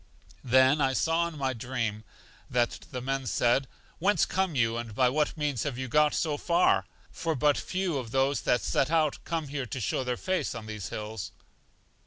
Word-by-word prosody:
I 130 - -10
then 130 +2 +4
saw 165 +3 +2
in 165 -2 -8
my 135 -2 0
dream 115 -3 -3 0.5
that 120 -1 0
the 125 -2 -5
men 135 0 -2
said: 120 +4 +2 0.3
Whence 200 +5 +3
come 190 -4 -1
you, 115 -3 +2
and 115 -2 -5
by 125 +1 +4
what 150 +4 0
means 145 -6 -1
have 140 -5 -2
you 130 0 -3
got 150 +3 +3
so 155 -3 0
far? 170 - +2 0.2
For 165 -1 -2
but 145 +2 +3
few 185 -6 -2
of 120 -3 -6
those 135 +3 +1
that 125 - +2
set 135 - +1
out 155 -3 +2
come 160 -3 -2
here 140 -3 -3
to 120 - -5
show 115 +4 -1
their 125 -1 -2
face 185 -8 -1
on 110 -1 -6
these 105 -3 -6
hills. 105 -3 -5
135 Hz, 195 wpm, -28 LUFS, 120-150 Hz, 0.5 s, then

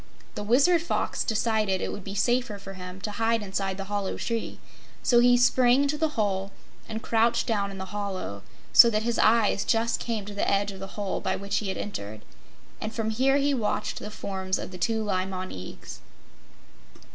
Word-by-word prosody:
The - - -5
Wizard 275 +11 +4
Fox 340 - -1
decided 215 -3 +1
it - - -3
would 205 - -7
be 195 +1 -6
safer 240 0 +1
for 195 -1 -9
him 180 0 -8
to 210 - -3
hide 225 +1 0
inside 195 -1 -2
the 195 - -4
hollow 200 -1 -3
tree, 230 -1 -3 0.5
so 240 - +5
he 245 0 +6
sprang 245 +2 +4
into 285 +1 0
the 305 -2 -1
hole 195 -2 0 0.4
and 220 0 -5
crouched 230 +1 +2
down 205 -3 0
in 195 - -8
the 190 - -5
hollow, 195 - -4 0.3
so 235 - +10
that 215 -1 0
his 235 0 -1
eyes 220 -3 +4
just 230 0 +1
came 225 -4 -3
to 205 - -7
the 205 - 0
edge 200 0 +1
of 195 - -10
the 195 +2 -9
hole 200 -2 -2
by 190 - -1
which 200 0 -2
he 210 - -2
had 190 - -3
entered, 110 - -6 0.6
and 215 +1 -4
from 220 -1 -1
here 265 +5 +3
he 285 0 +2
watched 230 -6 -1
the - - -6
forms 190 -3 -3
of - - -6
the 180 - -9
two 220 +4 0
Li 190 -3 0
Mon 185 -1 -5
Eags. 95 0 -9
210 Hz, 205 wpm, -27 LUFS, 195-230 Hz, 0.6 s, so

